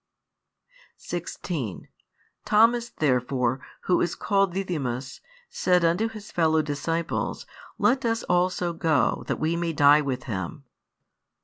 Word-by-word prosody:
16 165 - -5 0.6
Thomas 235 +2 +3
therefore, 125 - 0 0.2
who 180 - +2
is 175 - 0
called 195 -2 +1
Didymus, 140 -10 -3 0.3
said 180 -2 +2
unto 175 +7 +2
his 215 -2 -10
fellow 160 -2 +2
disciples, 165 +3 -2 0.3
Let 265 +2 +2
us 230 -1 0
also 180 -1 +1
go, 160 -5 +1
that - - -2
we 160 +2 0
may 170 -1 -1
die 145 0 +6
with 130 -3 -3
Him. 110 - -5
165 Hz, 115 wpm, -25 LUFS, 140-185 Hz, 0.6 s, die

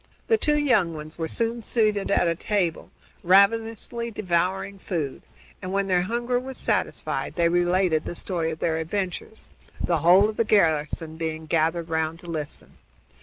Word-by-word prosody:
The 450 - +5
two 300 0 +2
young 220 - +2
ones 155 +2 -9
were 165 - -1
soon 230 +5 -1
seated 215 -3 +1
at 175 - +3
a 170 - +2
table, 180 -1 -1 0.3
ravenously 225 +5 +2
devouring 190 -1 -1
food, 160 -8 -3 0.4
and, 185 - -5
when 200 0 +1
their 185 -2 +2
hunger 240 +5 -1
was 260 +1 -7
satisfied, - - -2
they 170 -1 +3
related 175 -2 +2
the - - -5
story 170 -2 -1
of 160 - -4
their 160 0 0
adventures, 185 +5 -4 0.3
the 170 -2 0
whole 180 +6 +6
of 215 - -5
the - - +3
garrison 160 -5 +1
being 160 -1 -4
gathered 165 +1 0
round 160 0 -1
to 175 - -13
listen. 155 -3 -6
180 Hz, 165 wpm, -25 LUFS, 165-215 Hz, 0.4 s, whole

